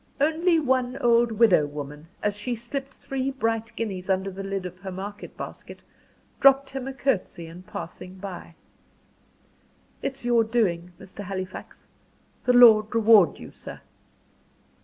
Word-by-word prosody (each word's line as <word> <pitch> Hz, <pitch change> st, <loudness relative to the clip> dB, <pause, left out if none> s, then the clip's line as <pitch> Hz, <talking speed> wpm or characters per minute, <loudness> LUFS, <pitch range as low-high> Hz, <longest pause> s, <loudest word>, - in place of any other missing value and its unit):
Only 325 Hz, +4 st, +3 dB
one 260 Hz, -3 st, 0 dB
old 235 Hz, 0 st, +3 dB
widow 205 Hz, -9 st, +4 dB
woman, 145 Hz, +1 st, -8 dB, 0.2 s
as 205 Hz, -1 st, 0 dB
she 240 Hz, +4 st, -3 dB
slipped 270 Hz, +4 st, -5 dB
three 265 Hz, 0 st, -4 dB
bright 225 Hz, -4 st, -2 dB
guineas 195 Hz, -4 st, -4 dB
under 190 Hz, +1 st, 0 dB
the 190 Hz, +1 st, -7 dB
lid 195 Hz, -1 st, -4 dB
of 180 Hz, 0 st, -8 dB
her 190 Hz, +1 st, -7 dB
market 200 Hz, +2 st, -8 dB
basket, -, -, -8 dB, 0.6 s
dropped 275 Hz, 0 st, +5 dB
him 265 Hz, -1 st, -5 dB
a 270 Hz, -, -4 dB
curtsey 210 Hz, -10 st, -1 dB
in 165 Hz, +2 st, -11 dB
passing 185 Hz, 0 st, -8 dB
by. 185 Hz, -3 st, -8 dB, 1.5 s
"It's 270 Hz, -2 st, -3 dB
your 240 Hz, -1 st, +4 dB
doing, 180 Hz, -7 st, 0 dB
Mr. 190 Hz, +2 st, -10 dB
Halifax. 185 Hz, -1 st, -7 dB, 0.6 s
The 250 Hz, -, +4 dB
Lord 225 Hz, -3 st, +7 dB
reward 220 Hz, -5 st, +6 dB
you, -, -, -11 dB
sir." -, -, -10 dB
215 Hz, 140 wpm, -25 LUFS, 185-250 Hz, 1.5 s, Lord